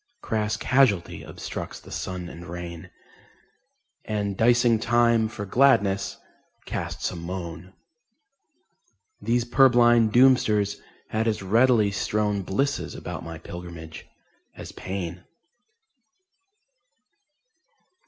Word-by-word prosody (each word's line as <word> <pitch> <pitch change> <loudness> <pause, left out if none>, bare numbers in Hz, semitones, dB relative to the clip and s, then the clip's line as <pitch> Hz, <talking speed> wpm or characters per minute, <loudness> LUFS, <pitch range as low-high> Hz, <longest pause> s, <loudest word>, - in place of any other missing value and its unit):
Crass 105 -1 -1
Casualty 125 -10 +2
obstructs - - -7
the - - -15
sun 90 -2 -5
and 85 +1 -10
rain, 85 -1 -7 1.1
And 105 -2 -2
dicing 120 +1 +3
Time 115 -1 +3
for 110 -2 -6
gladness 100 -5 +2 0.5
casts - - -4
a - - -7
moan.... 85 +1 -7 1.5
These 120 0 +1
purblind 120 -3 +5
Doomsters 110 -5 +3 0.3
had 110 +1 -1
as 110 -3 -1
readily 110 +1 +3
strown 105 0 -1
Blisses 135 +10 -2
about - - -6
my 80 0 -7
pilgramage 85 -1 -9 0.5
as - - -9
pain. 90 -2 -6
105 Hz, 95 wpm, -25 LUFS, 90-120 Hz, 1.5 s, purblind